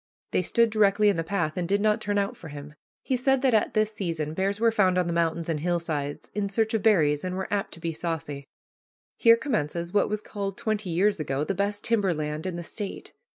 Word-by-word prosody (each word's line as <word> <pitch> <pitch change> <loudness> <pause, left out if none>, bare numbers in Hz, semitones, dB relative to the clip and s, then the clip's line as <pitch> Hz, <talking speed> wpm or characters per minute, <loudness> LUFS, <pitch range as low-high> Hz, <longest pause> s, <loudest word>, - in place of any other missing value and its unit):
They - - +2
stood 230 +5 +2
directly 210 -1 +4
in 200 - +1
the 165 - 0
path 165 -3 -2
and 175 -1 -2
did 200 +1 +3
not 215 +1 +2
turn 205 -1 -1
out 200 -1 0
for 160 - -11
him. 145 0 -9 0.3
He 260 - 0
said 265 +1 +2
that 260 -3 +3
at 220 - +2
this 215 0 +2
season 165 -7 -3
bears 195 +4 -1
were 230 0 +4
found 190 -4 +3
on 180 - +2
the 170 - -2
mountains 170 0 0
and 160 -3 -1
hillsides 160 -4 -2
in 205 -1 -1
search 220 +2 0
of 220 - +1
berries 155 -10 +3
and 185 0 -3
were 190 +3 -4
apt 200 -1 -1
to - - -14
be 165 0 -3
saucy. 150 -4 -4 0.7
Here 230 0 +6
commences 170 - -2
what 205 - +3
was 210 0 -2
called, 195 -2 -5
twenty 215 -3 -2
years 190 +3 +2
ago, 140 -1 -1
the 195 - -1
best 200 +2 -1
timber 205 -7 +2
land 150 +2 -3
in 180 - -3
the 175 - -5
State. 200 +4 -6
190 Hz, 235 wpm, -26 LUFS, 165-210 Hz, 0.7 s, Here